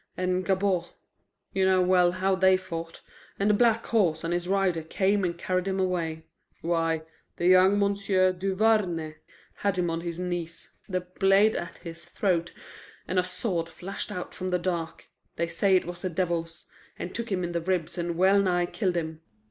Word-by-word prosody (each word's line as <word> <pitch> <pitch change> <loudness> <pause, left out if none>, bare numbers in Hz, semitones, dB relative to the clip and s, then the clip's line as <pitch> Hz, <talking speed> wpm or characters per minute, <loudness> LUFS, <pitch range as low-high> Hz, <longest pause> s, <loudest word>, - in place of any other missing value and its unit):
And 185 0 0
Gabord 190 -2 +1 0.7
you 190 - +1
know 190 -1 +4
well 180 -1 +4
how 190 +1 +1
they 190 0 +4
fought, 165 -3 -7 0.4
and 200 +1 +2
the - - +3
black 230 +1 +3
horse 175 -9 +1
and 165 +1 -1
his 175 0 -2
rider 190 -3 +1
came 195 +5 +1
and 170 -1 -1
carried 185 +1 -1
him 190 0 -1
away. 170 -4 -1 0.4
Why, 165 -1 0 0.3
the 175 - -3
young 185 +2 +6
M'sieu' 200 -2 +2
Duvarney 185 -4 0 0.4
had 200 -2 0
him 175 -2 0
on 165 0 -2
his 170 -1 -5
knees, 175 -2 -5 0.2
the 185 -1 -1
blade 195 +4 +3
at 170 -1 -5
his 170 0 -9
throat, 175 -4 0 0.6
and 185 - +1
a - - +2
sword 180 -2 -2
flashed 195 +3 -6
out 180 -3 -5
from 185 0 -4
the 180 - +2
dark 170 -2 -4 0.3
they 170 - 0
say 190 +3 +2
it 185 - +2
was 175 0 -7
the 185 - -2
devil's 170 -2 -2 0.3
and 180 - -6
took 235 -2 -4
him 185 -2 0
in 175 - -2
the 170 -1 -1
ribs 175 -2 -1
and 170 -1 -3
well 190 +2 +5
nigh 175 -2 +1
killed 180 -1 -1
him." 160 -1 -4
180 Hz, 185 wpm, -27 LUFS, 170-190 Hz, 0.7 s, young